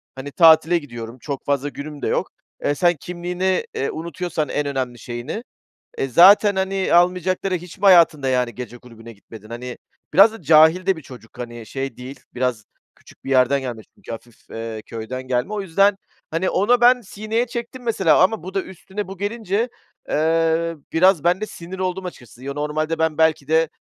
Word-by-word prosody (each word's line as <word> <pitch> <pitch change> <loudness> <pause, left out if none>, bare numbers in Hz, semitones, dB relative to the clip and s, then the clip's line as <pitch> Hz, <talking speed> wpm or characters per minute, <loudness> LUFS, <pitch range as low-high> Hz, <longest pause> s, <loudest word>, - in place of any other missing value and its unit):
hani, 135 +2 -7
tatile 165 +1 +5
gidiyorum. 120 -6 -8
Çok 140 +1 -6
fazla 140 0 0
günüm 145 +1 -8
de - - -2
yok. - - -1 0.3
Eee, 145 - +1
sen 175 +3 +3
kimliğini, 180 +1 -2
eee, 135 - -1
unutuyorsan 170 -1 -4
en 145 - -1
önemli 130 -4 -3
şeyini, 125 - -6 0.5
eee, 135 - -1
zaten, 195 - +6
hani, 190 -1 -1
almayacakları... 180 +2 +2
Hiç 180 +1 -8
mi 195 - -22
hayatında 170 -7 +5
yani 125 -2 0
gece 120 -1 -8
kulübüne 115 -1 -13
gitmedin? 110 +1 -14
Hani, 125 +1 -7 0.4
biraz 200 +4 +7
da 225 - -11
cahil 160 +3 +5
de 190 -3 +2
bir - - -9
çocuk, 120 -5 -14
hani, 120 -2 -7
şey 135 +5 -5
değil, 130 +2 -9
biraz 125 -4 -2 0.3
küçük - - -20
bir - - -5
yerden 135 +1 +3
gelmiş 120 -4 -7
çünkü - - -11
hafif, 115 0 -11
eee, 115 -1 -6
köyden 115 +3 -6
gelme. 130 +9 -2
O 210 - -2
yüzden, 195 +2 +2 0.3
hani, 170 +3 0
orada 240 +6 +2
ben 250 +1 +6
sineye 220 +3 -3
çektim 240 +1 -6
mesela 190 -9 +3
ama 190 -2 +1
bu 185 - -8
da 195 - 0
üstüne 190 +2 -7
bu 195 +1 -9
gelince, 215 +2 -2 0.4
eee, 165 +1 +1 0.2
biraz 180 -1 +4
ben 175 +3 +2
de - - -1
sinir 185 -2 -9
oldum 185 0 -2
açıkçası. 125 -7 -11
Yo, 140 0 -5
normalde 155 +2 -2
ben 160 -1 0
belki 160 -3 +2
de 160 0 +2
160 Hz, 185 wpm, -21 LUFS, 130-190 Hz, 0.5 s, biraz